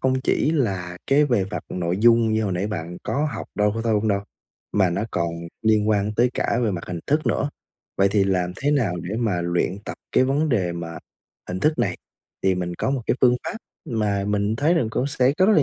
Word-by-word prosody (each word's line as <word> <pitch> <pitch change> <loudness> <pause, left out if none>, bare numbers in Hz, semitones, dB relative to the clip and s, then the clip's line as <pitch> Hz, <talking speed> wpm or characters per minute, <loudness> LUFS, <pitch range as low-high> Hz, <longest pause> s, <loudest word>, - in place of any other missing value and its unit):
không 130 0 +1
chỉ 145 - +1
là 95 - -1
cái 145 +2 +4
về 120 -8 +2
vặt 95 - -5
nội 90 0 -2
dung 115 -1 +5
như 110 0 +1
hồi 95 - -1
nãy 90 +3 -1
bạn 85 -4 -5
có 150 +2 0
học - - -5
đâu 105 0 +2
có 115 - -2
thôi 115 -1 +1
hông 110 +1 +1
đâu, 100 -1 +2 0.5
mà 95 -4 +3
nó 100 +4 -1
còn 85 -1 0 0.3
liên 110 -1 +3
quan 105 0 +1
tới 120 +2 +3
cả 115 - 0
về 110 - +2
mặt 85 -3 -4
hình 90 -2 -4
thức 155 +2 +1
nữa. 145 - +1 0.5
Vậy 100 0 +4
thì 100 -1 +3
làm 90 -2 0
thế 145 +2 0
nào 120 -12 +1
để 100 +5 -4
mà 105 -7 0
luyện 85 +2 0
tập - - -5 0.2
cái 130 - +4
vấn 145 +4 +1
đề 95 -9 +1
mà 85 -1 -6 0.5
hình 90 +1 -3
thức 155 +5 +2
này? - - 0 0.5
Thì 95 -1 +3
mình 90 -1 -3
có 130 - -1
một 135 -3 -1
cái - - +2
phương 125 -1 +5
pháp 220 - -4 0.3
mà 105 -5 0
mình 105 +1 0
thấy 160 +7 +3
rằng 130 -9 +2
cũng 130 - 0
sẽ 135 -2 +2
có 185 - +5
rất 215 - +5
là 150 - +6
105 Hz, 240 wpm, -23 LUFS, 95-130 Hz, 0.5 s, là